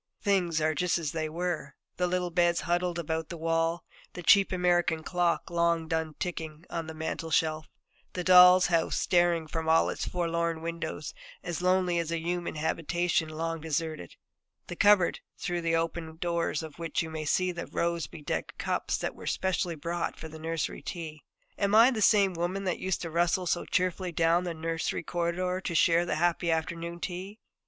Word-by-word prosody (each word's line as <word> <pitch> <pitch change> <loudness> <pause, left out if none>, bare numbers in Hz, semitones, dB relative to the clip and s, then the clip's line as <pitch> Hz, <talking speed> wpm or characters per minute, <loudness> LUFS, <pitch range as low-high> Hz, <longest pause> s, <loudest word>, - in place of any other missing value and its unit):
Things 180 -5 +2
are 155 0 +1
just 180 +1 +1
as 160 -4 -3
they 155 -1 -2
were: 175 0 -3 0.2
the 180 - +1
little 180 0 -1
beds 175 0 +2
huddled 175 0 0
about 160 -1 -3
the 170 - -6
wall; 165 +1 0 0.3
the 180 - -7
cheap 195 +3 +5
American 175 -3 +1
clock, 175 0 0
long 170 -1 +1
done 160 -1 -2
ticking, 160 -2 -5
on 165 -2 -3
the 160 - -7
mantelshelf; 160 0 -1 0.5
the 180 - -3
doll's 180 0 +8
house, 165 -2 +1
staring 175 -2 +2
from 160 0 -3
all 165 0 +4
its - - -4
forlorn 170 -2 -1
windows, 165 -2 -4 0.3
as 175 -1 -4
lonely 180 -1 +2
as 165 -1 -2
a 170 - 0
human 175 +1 -3
habitation 165 +1 0
long 165 +1 -3
deserted; 160 - -3 0.5
the 175 - -7
cupboard, 200 -1 +4 0.2
through 175 -1 -2
the 165 0 +1
open 165 -1 -3
doors 170 -2 -1
of 160 0 -10
which 165 0 -1
you 160 - -7
may 155 -1 -4
see 185 +4 +1
the 170 -1 -6
rose 170 -1 -1
bedecked 150 - -5
cups - - -1
that - - -3
were - - -10
specially 180 -2 -1
bought 170 +3 -3
for 160 - -7
the 160 0 -10
nursery 165 0 -3
tea. 160 -4 -6 0.4
Am 200 +1 +2
I 230 +4 +8
the 225 -4 -2
same 200 -2 +5
woman 175 +3 -2
that 185 -3 -1
used 190 -2 -2
to 165 - -5
rustle 175 +2 +1
so 175 0 0
cheerfully 185 0 -1
down 170 +2 +2
the 170 -2 -3
nursery 165 +1 -2
corridor 175 +2 -1
to 170 - -3
share 170 +2 +4
that - - 0
happy 175 +1 +1
afternoon 170 +1 -2
tea? 185 +4 -5
170 Hz, 180 wpm, -29 LUFS, 160-180 Hz, 0.5 s, doll's